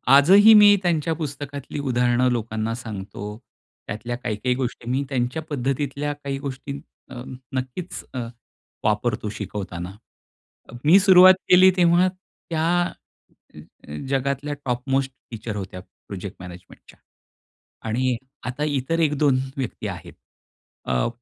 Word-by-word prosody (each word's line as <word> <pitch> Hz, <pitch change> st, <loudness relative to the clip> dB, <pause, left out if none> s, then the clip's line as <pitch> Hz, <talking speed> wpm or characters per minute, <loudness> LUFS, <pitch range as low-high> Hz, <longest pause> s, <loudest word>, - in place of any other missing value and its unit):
आजही 195 Hz, +10 st, +8 dB
मी 205 Hz, -1 st, +8 dB
त्यांच्या 165 Hz, -2 st, +1 dB
पुस्तकातली 145 Hz, -2 st, -6 dB
उदाहरणं 125 Hz, -2 st, +2 dB
लोकांना 110 Hz, -1 st, -2 dB
सांगतो. 105 Hz, -2 st, -7 dB, 0.5 s
त्यातल्या 120 Hz, +3 st, -4 dB
काही-काही 125 Hz, +1 st, -1 dB
गोष्टी 125 Hz, -2 st, -4 dB
मी 130 Hz, +3 st, 0 dB
त्यांच्या 130 Hz, +3 st, -1 dB
पद्धतीतल्या 140 Hz, +1 st, -2 dB
काही 140 Hz, -1 st, -5 dB
गोष्टी 140 Hz, 0 st, -6 dB, 0.3 s
अ, 125 Hz, -, -7 dB, 0.3 s
नक्कीच 130 Hz, +7 st, -5 dB
अ, 130 Hz, -, -3 dB, 0.7 s
वापरतो 110 Hz, +1 st, 0 dB
शिकवताना. 95 Hz, -3 st, -5 dB, 0.9 s
मी 165 Hz, +6 st, +7 dB
सुरुवात 185 Hz, -1 st, +8 dB
केली 185 Hz, +1 st, +8 dB
तेव्हा 175 Hz, +1 st, +4 dB
त्या 175 Hz, -3 st, -6 dB, 0.2 s
अ, 175 Hz, -, -11 dB
अ, 75 Hz, -, -12 dB
जगातल्या 140 Hz, +2 st, -1 dB
टॉप 125 Hz, +1 st, -3 dB
मोस्ट 135 Hz, 0 st, +1 dB, 0.2 s
टीचर 115 Hz, -2 st, -5 dB
होत्या 95 Hz, -2 st, -6 dB, 0.3 s
प्रोजेक्ट 100 Hz, -1 st, -7 dB
मॅनेजमेंटच्या. 90 Hz, -1 st, -13 dB, 0.9 s
आणि 125 Hz, +2 st, 0 dB, 0.3 s
आता 130 Hz, +4 st, -3 dB
इतर 145 Hz, +2 st, -1 dB
1-2 145 Hz, -4 st, +2 dB, 0.2 s
व्यक्ती 130 Hz, -4 st, -4 dB
आहेत. -, -, -8 dB, 0.7 s
अ 60 Hz, -1 st, 0 dB
130 Hz, 115 wpm, -23 LUFS, 115-150 Hz, 0.9 s, आजही